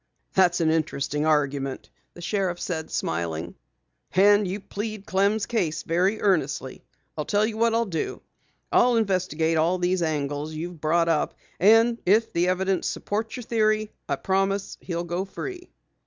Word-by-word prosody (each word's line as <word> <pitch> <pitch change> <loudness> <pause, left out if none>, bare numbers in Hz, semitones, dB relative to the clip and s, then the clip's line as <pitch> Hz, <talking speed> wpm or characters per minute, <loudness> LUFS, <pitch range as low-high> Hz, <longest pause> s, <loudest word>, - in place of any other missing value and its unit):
"That's 180 -2 +3
an 160 -1 +3
interesting 150 -1 -1
argument," 140 -3 0 0.2
the 175 - -10
sheriff 185 -2 -1
said, 160 -4 -3
smiling. 80 0 -3 0.6
"And 205 +1 +5
you 190 +3 -3
plead 210 +1 -6
Clem's 200 +2 +1
case 170 -10 -1
very 185 +6 +1
earnestly. 150 -8 0 0.3
I'll 150 - -3
tell 205 +1 +2
you 220 0 -3
what 230 0 +2
I'll 230 0 +2
do. 170 -6 -4 0.5
I'll 245 0 +4
investigate 185 -7 +1
all 165 +4 +2
these 180 0 0
angles 150 -1 -2
you've 165 0 -6
brought 165 +2 +2
up, 160 -3 +1 0.2
and 225 +4 +5
if 220 +5 +3
the 175 +1 +2
evidence 190 +1 0
supports 220 +2 -3
your 250 - -6
theory, 215 -2 +1 0.2
I - - +2
promise 195 +1 -1
he'll 170 -2 -3
go 175 +2 -2
free." 355 - -7
185 Hz, 155 wpm, -25 LUFS, 160-210 Hz, 0.6 s, And